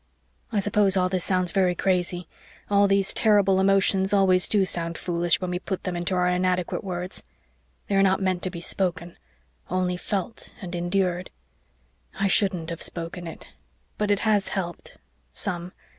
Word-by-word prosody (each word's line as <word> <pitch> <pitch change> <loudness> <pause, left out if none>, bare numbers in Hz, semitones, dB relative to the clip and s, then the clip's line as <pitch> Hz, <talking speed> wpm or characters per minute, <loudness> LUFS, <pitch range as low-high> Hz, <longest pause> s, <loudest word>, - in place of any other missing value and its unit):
I 215 - +1
suppose 200 -1 +3
all 185 0 +2
this 185 -2 -1
sounds 185 -2 +1
very 185 -3 +2
crazy 180 -1 0 0.4
all 200 0 +5
these 195 -1 +2
terrible 200 -3 +4
emotions 195 0 +3
always 185 -2 +4
do 200 -3 +3
sound 170 -2 0
foolish 175 -1 0
when 185 -1 -3
we 180 - -2
put 190 0 -4
them 180 -2 -3
into 175 +2 -1
our 180 0 +2
inadequate 180 0 0
words. 180 0 -4 0.7
They - - -2
are 195 - +5
not 190 -1 +3
meant 185 -2 0
to 185 - -2
be 170 -2 -7
spoken 175 -1 -2 0.5
only 180 0 0
felt 200 +4 -4
and 180 -5 -7
endured. 180 +1 -1 0.9
I 195 - +1
shouldn't 185 -4 +1
have 165 - -6
spoken 170 0 -4 0.7
but 210 -1 0
it 205 0 +2
has 210 -3 +2
helped 175 -3 -5 0.4
some. 180 -3 -4
185 Hz, 160 wpm, -25 LUFS, 175-195 Hz, 0.9 s, all